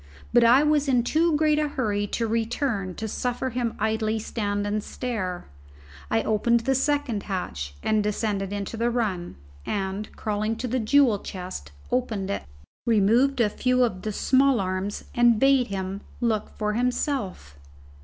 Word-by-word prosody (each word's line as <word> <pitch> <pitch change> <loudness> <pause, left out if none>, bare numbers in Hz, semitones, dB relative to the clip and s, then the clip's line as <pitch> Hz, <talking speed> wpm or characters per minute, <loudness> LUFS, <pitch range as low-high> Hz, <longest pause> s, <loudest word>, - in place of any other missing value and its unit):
But 240 0 +6
I 245 +5 +6
was 300 -1 +2
in 250 -3 +3
too 320 +5 +2
great 305 0 +3
a 305 - +1
hurry 210 -8 -1
to 230 - -1
return 225 -4 -1
to 220 - -4
suffer 250 +4 -2
him 235 -1 -1
to - - -4
idly 220 0 0
stand 205 -2 -2
and 205 0 -1
stare. 190 -8 -4 0.6
I 115 - +1
opened 235 +2 +2
the 270 +4 +1
second 265 -5 0
hatch 75 - -4
and 215 -1 +2
descended 205 -2 -1
into 205 +2 -4
the 235 +1 +1
run, 210 -8 -2 0.3
and 195 +1 -3
crawling 215 +1 -1
to 240 +3 -4
the 255 +2 0
jewel 240 -2 +4
chest 180 - -7 0.2
opened 220 -6 -1
it, - - -2 0.5
removed 235 +5 +3
a 230 - +4
few 255 +4 +1
of 190 -6 -1
the 215 - -3
small 265 +4 +3
arms, 185 +1 -2
and 240 -2 +4
bade 270 -1 +4
him 195 0 -4 0.2
look 220 -3 0
for 210 -1 -1
himself. 235 - -2
220 Hz, 165 wpm, -25 LUFS, 200-250 Hz, 0.6 s, But